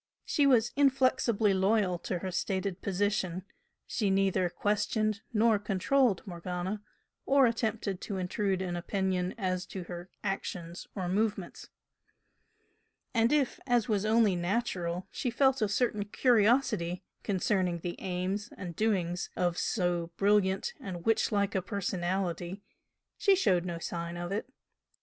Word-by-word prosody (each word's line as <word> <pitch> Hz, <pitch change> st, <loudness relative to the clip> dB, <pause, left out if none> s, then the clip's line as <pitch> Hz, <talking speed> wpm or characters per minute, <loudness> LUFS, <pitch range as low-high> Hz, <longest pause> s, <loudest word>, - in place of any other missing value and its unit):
She 285 Hz, -2 st, +3 dB
was 240 Hz, -3 st, +4 dB
inflexibly 255 Hz, -6 st, +3 dB
loyal 190 Hz, -2 st, +2 dB
to 180 Hz, -, -3 dB
her 185 Hz, +2 st, -4 dB
stated 190 Hz, 0 st, -2 dB
position; 190 Hz, -2 st, -1 dB, 0.4 s
she 210 Hz, -4 st, -1 dB
neither 190 Hz, -2 st, +2 dB
"questioned" 210 Hz, +2 st, 0 dB
nor 220 Hz, -1 st, +3 dB
"controlled" 210 Hz, +3 st, +1 dB
Morgana, 180 Hz, +2 st, -4 dB, 0.5 s
or 275 Hz, -1 st, +6 dB
attempted 220 Hz, -4 st, -1 dB
to 200 Hz, -, -4 dB
intrude 190 Hz, +1 st, -1 dB
an 175 Hz, -1 st, -3 dB
opinion 185 Hz, 0 st, -1 dB
as 185 Hz, -3 st, -1 dB
to 190 Hz, -, -6 dB
her 175 Hz, +1 st, -8 dB
actions 180 Hz, -3 st, -4 dB
or 185 Hz, -3 st, -2 dB
movements, 200 Hz, -1 st, -2 dB, 1.4 s
and 230 Hz, 0 st, +3 dB
if, 290 Hz, -4 st, +1 dB
as 245 Hz, -2 st, +2 dB
was 210 Hz, -4 st, +1 dB
only 215 Hz, -3 st, +4 dB
natural, 180 Hz, -2 st, -1 dB
she 250 Hz, -, -2 dB
felt 265 Hz, +1 st, +2 dB
a 215 Hz, -, +2 dB
certain 210 Hz, -1 st, 0 dB
curiosity 215 Hz, -5 st, +2 dB, 0.2 s
concerning 185 Hz, -3 st, 0 dB
the 175 Hz, 0 st, -4 dB
aims 190 Hz, +4 st, -2 dB
and 175 Hz, -3 st, -6 dB
doings 180 Hz, -5 st, 0 dB
of 175 Hz, -1 st, +1 dB
so 175 Hz, -4 st, 0 dB
brilliant 195 Hz, -1 st, +2 dB
and 175 Hz, -3 st, -7 dB
witch 225 Hz, -1 st, +2 dB
like 200 Hz, -1 st, +1 dB
a 190 Hz, -, +1 dB
personality 185 Hz, -1 st, -2 dB, 0.6 s
she 395 Hz, -2 st, +5 dB
showed 185 Hz, -, +2 dB
no 170 Hz, -2 st, -3 dB
sign 170 Hz, +1 st, -4 dB
of 175 Hz, +1 st, -4 dB
it. 210 Hz, +5 st, -3 dB
195 Hz, 135 wpm, -30 LUFS, 180-220 Hz, 1.4 s, or